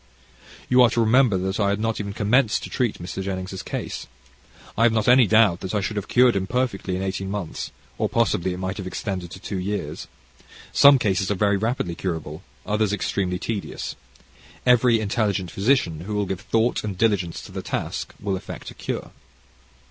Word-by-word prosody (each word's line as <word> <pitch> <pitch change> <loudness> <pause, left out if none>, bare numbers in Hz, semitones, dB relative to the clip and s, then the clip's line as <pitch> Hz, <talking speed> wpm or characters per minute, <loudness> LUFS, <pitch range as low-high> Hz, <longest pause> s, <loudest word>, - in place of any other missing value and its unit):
You 125 0 +5
are 120 - +7
to 120 - -1
remember 115 -2 +4
that 95 +3 -2
I 100 -1 +2
had 100 +1 0
not 115 0 -1
even 100 -1 -3
commenced 105 +3 +2
to - - -7
treat 120 -5 0
Mr. 90 +2 -5
Jennings' 95 0 -4
case. - - -5 0.7
I - - -1
have 115 0 +6
not 110 -1 +1
any 125 -2 +7
doubt 110 -4 +4
that 95 +2 -4
I - - +2
should 105 +2 -3
have 105 -1 -3
cured 125 -2 +4
him 95 -1 -1
perfectly 115 -6 -1
in 95 - -3
eighteen 95 0 -3
months, 100 -5 -4 0.3
or - - +1
possibly 90 +2 +1
it 90 - -4
might 95 +1 -3
have 95 -3 -5
extended 95 -2 -4
to 95 - -10
two 95 0 -4
years. 100 +3 -4 0.7
Some 140 0 +8
cases 100 -5 0
are 105 - +1
very 100 +1 +2
rapidly 110 -3 -1
curable, 80 -3 -4 0.2
others 105 -1 +1
extremely 95 -3 -1
tedious. 105 +1 -4 0.7
Every 125 -2 +5
intelligent 100 -4 -1
physician 95 - +1
who 100 +5 -5
will 105 0 +1
give 95 -2 -4
thought 115 +4 +1
and 100 -3 -4
diligence 95 -6 +1
to - - -11
the - - -5
task, - - -4
will 100 -1 -1
effect 95 +1 -7
a - - -11
cure. - - -5
100 Hz, 195 wpm, -24 LUFS, 95-115 Hz, 0.7 s, Some